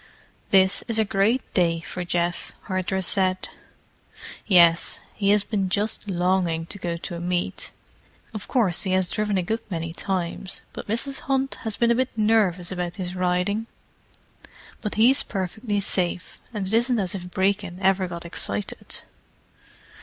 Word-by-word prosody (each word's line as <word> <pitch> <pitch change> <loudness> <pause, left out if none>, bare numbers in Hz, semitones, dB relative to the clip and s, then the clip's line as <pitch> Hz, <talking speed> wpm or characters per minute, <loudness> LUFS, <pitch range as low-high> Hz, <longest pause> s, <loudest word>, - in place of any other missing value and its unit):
"This 190 0 +4
is 230 -2 +2
a 220 - +3
great 205 +6 +1
day 170 -3 +2
for 180 +1 -5
Geoff," 175 0 -1
Hardress 185 -1 -1
said. 185 -1 +3 1.0
"Yes—he 175 +2 +4
has 205 0 +4
been 200 -4 -1
just 205 +2 0
longing 175 -2 +1
to 200 - -9
go 170 -2 -2
to 170 - -5
a - - -5
meet. 175 0 -2 0.6
Of 215 -2 -6
course 210 -10 +2
he 190 -2 0
has 185 -1 +1
driven 210 -2 0
a 185 - +1
good 220 +6 -1
many 165 -3 -3
times, 185 0 -3
but - - -7
Mrs. 235 +6 -1
Hunt 270 0 +1
has 220 -2 -2
been 235 0 +3
a 235 +2 +3
bit 260 - -1
nervous 210 -5 +2
about 180 -1 -3
his 180 -1 -4
riding. 185 +4 0 1.1
But 210 - -3
he's 245 +6 +5
perfectly 205 +3 -2
safe—and 190 +2 -2
it 190 - -5
isn't 240 +2 +3
as 190 -4 -1
if 180 -2 -6
Brecon 190 -1 0
ever 190 -1 +2
got 170 -1 -7
excited." 100 -11 -2
190 Hz, 155 wpm, -24 LUFS, 175-210 Hz, 1.1 s, he's